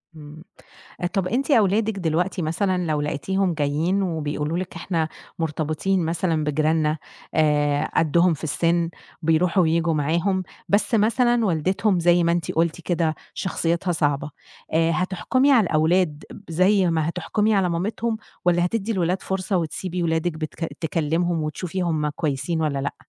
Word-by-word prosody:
إمم. 155 +1 -11 0.7
طَب 195 -2 0
أنتِ 260 +9 -1
أولادِك 215 -2 +2
دلوقتي 175 +3 0
مثلًا 180 +3 0
لو 150 -1 0
لقيتيهم 185 +6 -1
جايين 155 +6 0
وبيقولوا 155 -2 -2
لِك 185 0 -5
إحنا 165 -4 -1 0.3
مرتبطين 160 +3 -1
مثلًا 165 -1 0
بجيراننا 155 +1 +1 0.4
آآ 150 -2 +2
قدّهم 170 +2 +3
في 155 - -8
السِن 170 +2 +1 0.3
بيرُوحوا 165 +3 +3
وييجوا 165 0 +1
معاهم، 170 +6 0 0.3
بس 205 +3 +2
مثلًا 235 +2 +3
والدتهم 185 +2 +1
زَي 175 0 +4
ما 170 - +3
أنتِ 170 -2 -1
قُلتِ 165 +1 0
كده 165 -2 0 0.2
شخصيتها 170 0 -1
صعبة، 145 -3 0 0.4
آآ 165 +1 +3
هتحكُمي 200 - +1
على 245 -5 +6
الأولاد 160 0 +1 0.3
زَي 185 +2 +3
ما 160 -1 0
هتحكُمي 210 +5 0
على 190 -2 +2
مامتهم؟ 220 +6 -2 0.3
والّا 175 0 +3
هتدّي 220 +3 -1
الولاد 185 -2 0
فرصة 190 0 -1
وتسيبي 175 +2 -3
ولادِك 165 +1 0
بتك 155 +1 -5
تكلمهم 165 +1 0
وتشوفي 180 +4 -3
هُم 155 -3 0
كويسين 150 +2 -2
والّا 145 -3 0
لأ؟ 140 - -3
170 Hz, 140 wpm, -23 LUFS, 155-185 Hz, 0.7 s, على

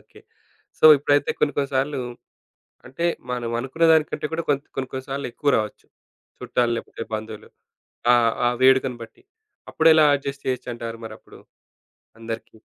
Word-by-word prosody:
Okay. - - -19 0.6
So, - - -2
ఇప్పుడైతే 145 0 +1
కొన్ని 145 - +1
కొన్ని 140 -1 0
సార్లు, 135 +1 0 0.9
అంటే 135 +7 -4 0.3
మనం 120 -2 -3
అనుకున్న 135 +6 -3
దానికంటే 155 -1 0
కూడా, 165 0 -2
కొంత్ 140 0 0
కొన్ని, 130 -1 -3
కొన్ని 130 0 -4
సార్లు 140 +1 -3
ఎక్కువ 140 +4 0
రావచ్చు, 110 -1 -4 0.5
చుట్టాలు 120 -1 0
లేపోతే 115 - -7
బంధువులు. 110 0 -6 0.6
ఆ! - - +7 0.3
ఆ - - +5
వేడుకను 130 -2 +4
బట్టి. 115 - -20 0.5
అప్పుడు 160 0 +3
ఎలా 155 -1 +6
అడ్జస్ట్ 140 0 -7
చేయొచ్చంటారు 120 -2 -4
మరప్పుడు? - - -13 0.8
అందరికి. 115 0 -7
130 Hz, 140 wpm, -23 LUFS, 115-145 Hz, 0.9 s, ఆ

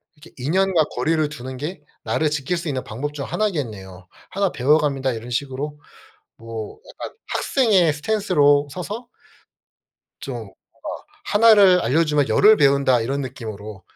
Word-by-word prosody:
이렇게 155 +2 -17
'인연과 175 +5 +2
거리를 155 +4 +1
두는 130 -3 -8
게 150 +3 -6 0.2
나를 155 -1 0
지킬 150 +4 -2
수 170 0 -5
있는 130 -4 -2
방법 140 +7 -5
중 140 -2 -5
하나겠네요. 110 - -4 0.2
하나 195 -1 0
배워갑니다.' 140 0 +2
이런 115 +1 -7
식으로 140 +4 -4 0.6
뭐 115 -2 -8 0.2
약간 - - -7 0.2
학생의 200 - +3
스탠스로 145 -5 +2
서서 210 - -6 1.1
좀 - - -6
뭔가 - - -15 0.7
'1 225 +1 +6
를 190 -3 +6
알려주면 150 +2 +2
10 - - +1
을 215 +1 +8
배운다.' 140 - +3
이런 135 +5 -2
느낌으로 110 -6 -7
145 Hz, 295 characters per minute, -22 LUFS, 130-175 Hz, 1.1 s, 을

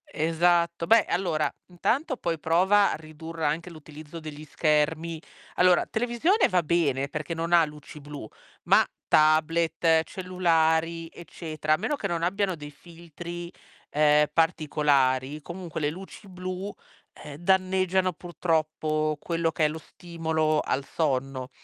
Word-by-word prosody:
Esatto, 170 +1 +1
beh 225 -1 +5
allora 160 -5 0 0.2
intanto 260 - -1
poi 170 -5 -2
prova 190 +6 +3
a - - -2
ridurre 160 +1 -7
anche 160 +4 -1
l'utilizzo 155 0 -11
degli 155 -1 -9
schermi. 155 +2 0 0.3
Allora 180 -1 +4
televisione 245 - +1
va 180 -2 +2
bene 150 -5 +1
perché 155 +3 -5
non 165 +1 -2
ha 170 -1 +7
luci 150 0 -11
blu, 145 -5 -8 0.4
ma - - +5 0.2
tablet, 160 +1 +3
cellulari, 165 -2 0
eccetera, 155 -2 -3
a - - +3
meno 220 - -1
che 205 - -3
non 170 -2 -2
abbiano 190 +1 0
dei 150 -2 -9
filtri, 170 +2 -9 0.4
ehm, 150 0 +4
particolari, 150 -4 +1
comunque 170 +1 -7
le 145 - +1
luci 190 +5 -10
blu, 185 +2 -6 0.4
ehm, 145 -2 -10
danneggiano 185 +1 +1
purtroppo 155 -3 -1
quello 165 0 -1
che 155 - +1
è - - +5
lo 155 - -5
stimolo 160 -2 -2
al 135 - -1
sonno. 135 -4 -2
165 Hz, 135 wpm, -26 LUFS, 155-175 Hz, 0.4 s, ha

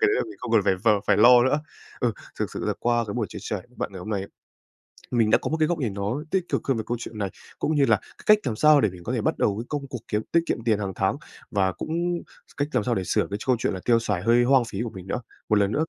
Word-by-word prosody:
cái 425 - +4
đấy 415 - +2
là - - +1
mình 345 - -9
không 115 - -5
cần 110 - +6
phải 95 - +3
v - - +5 0.2
phải - - +4
lo 120 +3 +8
nữa. 140 +4 +2 0.4
Ừ, 120 -3 +2 0.3
thực - - -1
sự - - -4
là - - +1
qua 120 -1 +2
cái 100 - -5
buổi 115 -3 -1
chia - - -8
sẻ 105 +2 -3
v 125 - -24
bạn - - -3
ngày 95 - -7
hôm 105 +5 -7
nay 100 - 0
ấy, 95 - -7 0.8
mình 115 -3 +3
đã - - +6
có - - -4
một 160 - 0
cái 155 - +3
góc 175 0 0
nhìn 120 -8 -1
nó 105 +9 -2
tích 190 -2 +2
cực - - -1
hơn 135 -3 +2
về 110 - -2
câu 120 0 -1
chuyện 115 -1 -8
này, 100 -2 -1 0.3
cũng 155 - 0
như 140 -2 +4
là - - +5 0.2
cái - - -17
cách - - -7
làm 120 -5 -2
sao 150 +4 +6
để 110 - +3
mình 90 -1 -12
có - - -3
thể - - 0
bắt - - 0
đầu 100 - +1
cái 115 - -5
công 145 -2 -3
cuộc 125 -2 -6
kiếm 105 - 0
tiết 170 - +5
kiệm 115 - -2
tiền 110 -3 +2
hàng 100 -2 -3
tháng - - +1 0.4
và 95 -2 +2
cũng 155 - -5 0.6
cách 145 - 0
làm 125 - +2
sao 120 +1 0
để 95 - -1
sửa - - +1
cái 100 - -3
châu 130 +3 +2
chuyện - - 0
là 95 - -4
tiêu 115 -1 +4
xài 105 -5 -1
hơi 120 +4 +4
hoang 130 0 +4
phí 110 -2 -5
của 120 - -3
mình 95 -3 -10
nữa. 120 - -2 0.3
Một 105 - +4
lần 100 -1 +2
nữa, 155 +8 +1
115 Hz, 320 wpm, -25 LUFS, 100-130 Hz, 0.8 s, lo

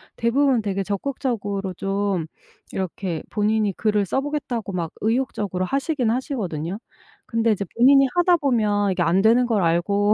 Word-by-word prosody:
대부분 250 +1 +2
되게 195 -1 -2
적극적으로 205 -3 -3
좀 195 -3 -1 0.5
이렇게 185 -2 -3
본인이 210 -1 +1
글을 210 -2 +1
써 270 +8 0
보겠다고 270 -8 -3
막 170 -3 -3
의욕적으로 215 -5 -1
하시기는 270 - 0
하시거든요. 195 - -3 0.5
근데 230 -1 +1
이제 200 -1 -1
본인이 275 +3 +6
하다 350 0 +4
보면 210 -8 +1
이게 180 -1 -1
안 175 +4 +2
되는 240 +2 +4
걸 215 -5 +1
알고 200 +5 +2
210 Hz, 345 characters per minute, -23 LUFS, 195-250 Hz, 0.5 s, 본인이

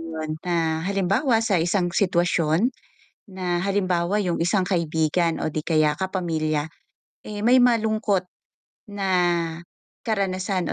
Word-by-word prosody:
'yon 155 -1 -5
na, 165 -2 0
halimbawa, 200 - +1
sa 195 -6 +2
isang 175 0 0
sitwasyon, 175 +3 +1 0.6
na 180 -2 -2
halimbawa, 185 -2 0
'yong 180 -5 -1
isang 185 +2 +1
kaibigan 165 -1 0
o 155 - -2
'di 155 - -2
kaya 155 -2 +2
kapamilya, 160 -5 -2 0.6
eh, 210 -1 -7
may 245 +3 +5
malungkot 215 -5 +1 0.7
na 195 -1 -2 1.0
karanasan 190 -4 -1
180 Hz, 110 wpm, -23 LUFS, 165-200 Hz, 1.0 s, may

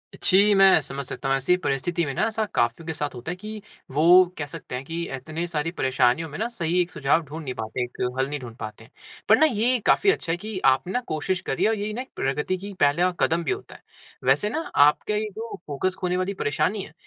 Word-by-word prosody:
जी, 205 +2 +4
मैं 195 -3 +7
समझ 140 0 -5
सकता 135 - -4
हूँ। 135 - +3
ऐसी 135 +7 +2
परिस्थिति 165 +5 0
में 140 - -3
न - - -4
ऐसा 220 0 +1
काफ़ियों 120 +7 0
के 160 - -3
साथ 145 -2 -4
होता 125 +7 -5
है - - -4
कि 215 +3 -8 0.3
वो 170 +6 +6
कह 150 - -3
सकते 135 -2 -8
हैं 125 - -4
कि 165 +3 -4
इतनी 155 +6 -5
सारी 165 -1 -2
परेशानियों 130 +1 +1
में 150 - -7
न 225 - 0
सही 175 -6 -1
एक 175 0 -3
सुझाव 140 +4 +2
ढूँढ़ 155 +3 -7
नहीं 130 -3 -4
पाते, 110 +2 -3
एक 125 - -9 0.2
हल 135 +1 0
नहीं 145 0 -3
ढूँढ़ 120 -3 -9
पाते। 110 0 -8 0.4
पर - - +7
न - - +5
ये 240 +3 +2
काफ़ी 405 - +4
अच्छा 165 - -3
है 170 - 0
कि 210 +1 -5
आप 135 +5 +4
ना 245 +7 -1
कोशिश 175 +4 -1
कर - - -3
रहीं - - +1
है 220 - +4
और 225 - -1
यही 210 +1 -3
ना 240 - -3
एक 260 - -10
प्रगति 150 +7 -1
की 200 +2 -8
पहला 170 +6 +3
कदम 165 +1 +2
भी 155 - -1
होता - - -5
है। - - -15 0.4
वैसे 135 +11 +3
न 315 +8 -2
आपका 150 +8 +4
ये 215 0 -1
जो 225 +1 -6
फ़ोकस 170 +6 -1
खोने 180 -1 -1
वाली 185 +2 -1
परेशानी 185 +8 0
है - - -12
165 Hz, 250 wpm, -24 LUFS, 140-195 Hz, 0.4 s, मैं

